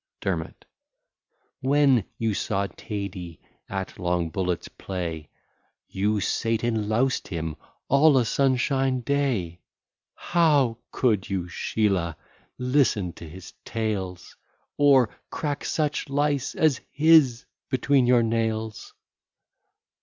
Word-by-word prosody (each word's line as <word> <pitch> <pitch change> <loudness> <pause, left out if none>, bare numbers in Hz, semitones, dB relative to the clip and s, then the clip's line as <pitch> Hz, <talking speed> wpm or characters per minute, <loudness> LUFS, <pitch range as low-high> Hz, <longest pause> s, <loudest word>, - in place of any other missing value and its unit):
DERMOT - - -4 0.9
When 135 -5 +3
you 115 -2 0
saw 100 0 -1
Tady 95 -4 -6 0.3
at 95 -1 -5
long 90 -2 0
bullets 90 -1 -2
play, 85 -5 -5 0.6
You 105 +2 0
sate 115 +3 -1
and 110 -3 0
loused 125 +4 +1
him 80 -4 -4 0.3
all 140 +1 +5
a 125 - +3
sunshine 130 +1 +1
day: 120 -11 -1 0.6
How 145 -9 +2
could 110 -7 +1
you, 95 -2 -1
Sheelah, 90 -3 -1 0.4
listen 125 - +1
to 85 - -10
his 90 +3 -11
tales, 95 -6 -4 0.4
Or 135 -5 +5 0.2
crack 145 -2 -3
such 150 -3 -1
lice 145 -1 0
as 155 -5 +2
his 145 -5 +4 0.2
between 130 0 +2
your 120 -1 +5
nails? 110 -1 -2
115 Hz, 105 wpm, -25 LUFS, 95-135 Hz, 0.9 s, all